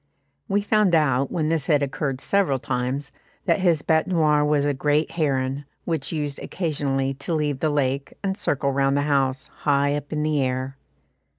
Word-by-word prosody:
We 200 +1 +1
found 210 -4 +3
out, 140 -4 +2
when 155 -3 0
this 160 -3 0
had 145 -3 +3
occurred 135 -1 -2
several 195 -9 +2
times, 130 +3 -3 0.3
that - - +2
his 170 -5 +2
bête 160 +1 +2
noire 155 -5 +3
was 150 -1 +2
a 145 - +1
great 150 +3 +1
heron, 135 -3 -1 0.2
which 160 -5 -1
used 150 -3 -3
occasionally 140 -6 -1
to 140 +5 -3
leave 150 -3 -1
the 155 - +1
lake, 140 -1 -1
and 190 -1 0
circle 140 -7 0
round 135 0 +2
the 145 - +1
house, 135 -2 +1
high 140 -1 +2
up 145 0 -6
in 150 -1 -1
the 155 -2 +1
air. 130 +1 -2
145 Hz, 180 wpm, -24 LUFS, 135-155 Hz, 0.3 s, found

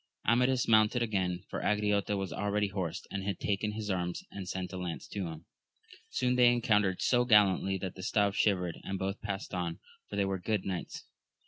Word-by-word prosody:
Amadis 125 +3 +3
mounted 110 +2 +4
again, 95 -5 -1
for - - -4
Angriote 105 -1 +1
was 95 -3 -3
already 105 0 0
horsed, 95 -4 -3
and 95 -1 -3
had 100 -1 -2
taken 105 +1 -1
his 105 -1 -3
arms, 90 -1 -2
and 95 -2 -6
sent 95 0 -4
a - - -4
lance 90 -2 -5
to 100 -4 -3
him. 80 0 -8 0.6
Soon 125 0 +1
they 120 -1 +7
encountered 105 -6 +2
so 125 -1 +4
gallantly, 100 -4 +4
that 95 -1 -4
the 95 - -9
staves 100 -1 +1
shivered, 90 -5 +1
and 95 - -3
both 95 +2 -3
passed 100 -1 -4
on, 85 -2 -2 0.3
for - - -5
they 100 -1 +2
were 95 -1 -2
good 105 +1 -1
knights. 95 -2 -4
100 Hz, 195 wpm, -31 LUFS, 95-105 Hz, 0.6 s, they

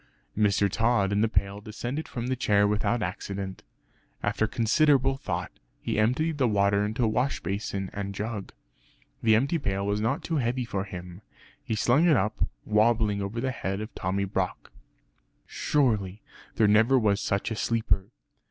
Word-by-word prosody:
Mr. 100 -1 +3
Tod 110 -1 +1
and 100 +1 +2
the 115 - +2
pail 100 -1 -1
descended 120 +8 -5
from 120 -3 -5
the 130 +1 0
chair 105 -4 +3
without 105 +2 0
accident. 95 +1 -5 0.6
After 110 - +1
considerable 135 +4 +3
thought, 135 - -4 0.3
he - - -2
emptied 145 +8 +1
the 130 - +3
water 100 -1 +2
into 110 +4 -1
a - - +3
wash 125 +5 0
basin 95 -1 -3
and 100 -1 -4
jug. 105 -1 -4 0.7
The 110 -1 +5
empty 140 +9 +1
pail 100 -6 -1
was 100 +1 0
not 120 +7 0
too 165 - -1
heavy 125 -1 0
for 100 -4 -3
him; 90 -1 -9 0.4
he 110 - -2
slung 125 +10 +3
it 155 -6 +5
up 105 +2 0 0.2
wobbling 105 -1 +2
over 100 +4 -3
the 130 +2 -1
head 95 -5 -3
of 110 +1 -6
Tommy 95 +2 -1
Brock. 95 -1 -3 0.7
Surely 110 -9 0 0.3
there 110 - +4
never 110 +6 +5
was 105 -4 +2
such 100 +3 -1
a - - -1
sleeper! 110 -4 0
110 Hz, 165 wpm, -27 LUFS, 100-120 Hz, 0.7 s, The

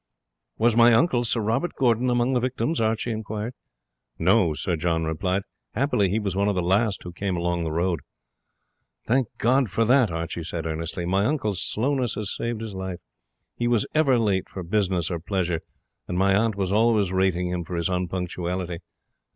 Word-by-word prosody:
"Was 115 0 +3
my 120 0 +7
uncle, 120 -1 +3
Sir 115 0 0
Robert 115 +11 -1
Gordon, 125 -1 +2
among 120 +1 +2
the 125 - +3
victims?" 130 +3 -1
Archie 110 +2 0
inquired. 110 +1 -4 0.6
"No," 80 -2 +3
Sir 85 +3 -1
John 80 0 0
replied; 90 +5 -1 0.3
"happily 110 -6 +2
he 100 - 0
was 100 -4 -2
one 100 +1 +1
of 105 - +1
the 90 - +1
last 100 +3 +1
who 90 - -7
came 95 0 -2
along 85 0 -1
the 80 - -2
road." 85 +1 0 1.1
"Thank 125 +1 +2
God 130 +1 +2
for 115 +5 +1
that!" 125 -1 +4
Archie 85 0 -4
said 80 0 -4
earnestly; 80 +2 -3
"my 95 +3 +1
uncle's 110 - 0
slowness 130 +1 0
has 105 -1 -3
saved 115 -1 -3
his 110 -2 -6
life. 95 -1 -4 0.6
He 120 - -1
was 120 -3 +2
ever 145 -5 +4
late 100 -5 0
for 95 - -6
business 90 -2 0
or 85 - -2
pleasure, 85 -2 -1 0.5
and 90 - -3
my 95 +1 +3
aunt 110 +1 +2
was 95 -2 -1
always 105 -3 +3
rating 95 -1 +1
him 90 -1 -2
for 90 - -6
his 85 -1 0
unpunctuality. 90 -1 -3
100 Hz, 185 wpm, -25 LUFS, 90-115 Hz, 1.1 s, my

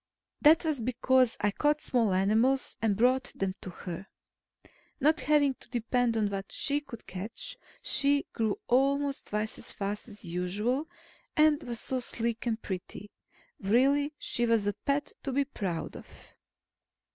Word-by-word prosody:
That 320 +3 +6
was 305 -6 +1
because 255 +1 +2
I 210 - +2
caught 295 +7 +2
small 235 -8 +1
animals 220 +8 +2
and 210 -3 +2
brought 250 +3 +3
them 195 -1 -1
to - - -6
her. 180 +1 -7 0.9
Not 310 +3 +3
having 290 -2 +3
to - - -16
depend 240 0 +1
on 210 -2 +1
what 195 0 -4
she 290 +1 +1
could 260 -6 -11
catch, 210 - -5 0.3
she 285 0 +2
grew 220 -2 0
almost 275 +2 +2
twice 210 +1 -2
as - - -7
fast 205 +2 -4
as 210 -3 -11
usual, 205 - -1 0.5
and 305 0 +5
was 235 -4 -4
so 260 - -2
sleek 235 -1 -3
and 225 -1 0
pretty. 190 0 -6 0.5
Really, 270 +8 +3
she 240 0 0
was 225 -3 +3
a 205 - +1
pet 285 +5 -2
to 275 - -3
be 280 +2 +1
proud 190 -11 -4
of. - - -10
240 Hz, 155 wpm, -30 LUFS, 210-280 Hz, 0.9 s, That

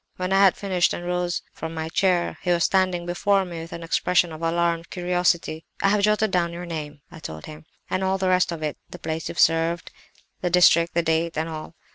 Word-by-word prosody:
When 185 +1 -2
I 195 - +4
had 195 -2 +5
finished 185 -3 +1
and 175 - -7
rose 180 0 -1
from 160 0 -6
my 160 0 -3
chair 180 +1 +1
he 180 - -3
was 170 -1 +3
standing 185 -2 +1
before 195 +3 +1
me 170 -2 -7
with 165 - -9
an 170 - -7
expression 175 +1 +1
of 155 0 -9
alarmed 170 0 0
curiosity. 175 -3 0 0.2
"'I 195 - +5
have 205 0 +2
jotted 210 0 +2
down 175 -2 +1
your 175 +1 -6
name,' 150 -3 -6
I - - -11
told 80 - -8
him, 155 +1 -11 0.2
'and 185 - -1
all 190 0 +1
the 190 -1 0
rest 185 -1 +3
of 165 -2 -5
it—the 155 +3 -6
place 160 -1 -4
you - - -6
served 165 +1 +2
at, - - -30
the 180 - 0
district, 170 -1 +4
the 170 - +2
date, 165 0 0
and 160 +1 -1
all. 160 0 -7
170 Hz, 225 wpm, -24 LUFS, 165-180 Hz, 0.2 s, had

